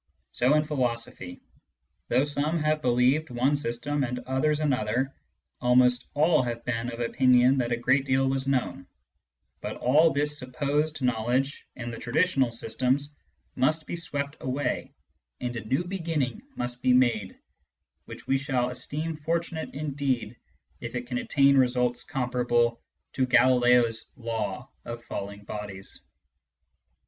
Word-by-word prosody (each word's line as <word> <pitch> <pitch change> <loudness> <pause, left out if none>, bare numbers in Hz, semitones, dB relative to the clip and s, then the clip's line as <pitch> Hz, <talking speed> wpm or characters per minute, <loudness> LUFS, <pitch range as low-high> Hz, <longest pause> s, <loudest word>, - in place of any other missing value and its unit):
So 125 - +3
in 150 - +3
philosophy: 115 - -3 0.6
though 130 - +3
some 145 +3 0
have 155 -1 +1
believed 125 +5 +2
one 125 +4 +1
system, 140 +2 -1
and 125 -1 -2
others 145 +4 0
another, 130 -2 0 0.5
almost 125 0 +4
all 155 0 +4
have 120 -1 -4
been 120 0 -2
of 115 - -8
opinion 125 +2 +4
that 120 -1 -1
a 120 - +1
great 130 +3 +2
deal 135 0 +2
was 135 0 -1
known; 135 -2 -1 0.7
but - - -4
all 150 +7 +4
this 145 +1 0
supposed 145 +3 -1
knowledge 125 +3 0
in 120 -1 -5
the 115 - -7
traditional 135 -1 +1
systems 130 +5 -1 0.4
must 155 +4 +1
be - - -4
swept 145 -4 -4
away, 130 +2 -2 0.5
and 125 -1 -3
a 115 - -4
new 135 +10 0
banning 165 -8 -2
must 125 0 -4
be 125 - +4
made, 115 -6 +2 0.7
which - - -9
we 135 0 +2
shall 125 -2 0
esteem 150 +6 -4
fortunate 165 +1 -2
indeed 140 -6 -2 0.4
if - - -6
it 125 0 -3
can 125 0 -3
attain 140 0 +4
results 125 -2 +2
comparable 120 -2 0 0.3
to 130 -1 +1
Galileo's 125 -2 +4
law 115 -6 -4 0.2
of 120 0 -7
falling 100 -1 -6
bodies. 100 -2 -7
130 Hz, 135 wpm, -27 LUFS, 120-145 Hz, 0.7 s, almost